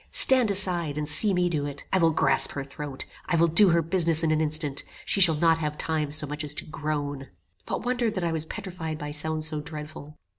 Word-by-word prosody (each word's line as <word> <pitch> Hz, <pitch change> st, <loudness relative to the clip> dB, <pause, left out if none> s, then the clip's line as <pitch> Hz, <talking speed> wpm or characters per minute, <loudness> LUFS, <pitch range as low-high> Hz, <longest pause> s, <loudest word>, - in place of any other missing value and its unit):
stand 255 Hz, -4 st, +7 dB
aside, 175 Hz, -6 st, +1 dB
and 150 Hz, -1 st, -3 dB
see 200 Hz, +7 st, +5 dB
me 180 Hz, -1 st, +1 dB
do 150 Hz, -4 st, -2 dB
it. 140 Hz, -1 st, -8 dB
I 190 Hz, -, +3 dB
will 165 Hz, -2 st, +3 dB
grasp 160 Hz, -, +1 dB
her 140 Hz, -, -5 dB
throat; 140 Hz, 0 st, -7 dB, 0.2 s
I 175 Hz, -, 0 dB
will 170 Hz, 0 st, +3 dB
do 175 Hz, +5 st, +6 dB
her 170 Hz, -1 st, +2 dB
business 165 Hz, -1 st, +1 dB
in 160 Hz, -, +1 dB
an 155 Hz, 0 st, +1 dB
instant; 150 Hz, -2 st, -2 dB, 0.2 s
she 200 Hz, -, +1 dB
shall 165 Hz, -4 st, +7 dB
not 165 Hz, +1 st, +2 dB
have 150 Hz, -1 st, -4 dB
time 155 Hz, -2 st, -2 dB
so 150 Hz, 0 st, 0 dB
much 150 Hz, +1 st, -5 dB
as 150 Hz, 0 st, 0 dB
to -, -, -4 dB
groan." 145 Hz, -3 st, -5 dB, 0.4 s
What -, -, -4 dB
wonder 245 Hz, -2 st, 0 dB
that 190 Hz, -4 st, -4 dB
I 170 Hz, -, -1 dB
was 160 Hz, -1 st, -3 dB
petrified 175 Hz, -6 st, -6 dB
by 150 Hz, -1 st, -7 dB
sounds 155 Hz, +1 st, -3 dB
so 155 Hz, -1 st, -4 dB
dreadful! 150 Hz, -1 st, -10 dB
160 Hz, 230 wpm, -25 LUFS, 150-175 Hz, 0.4 s, stand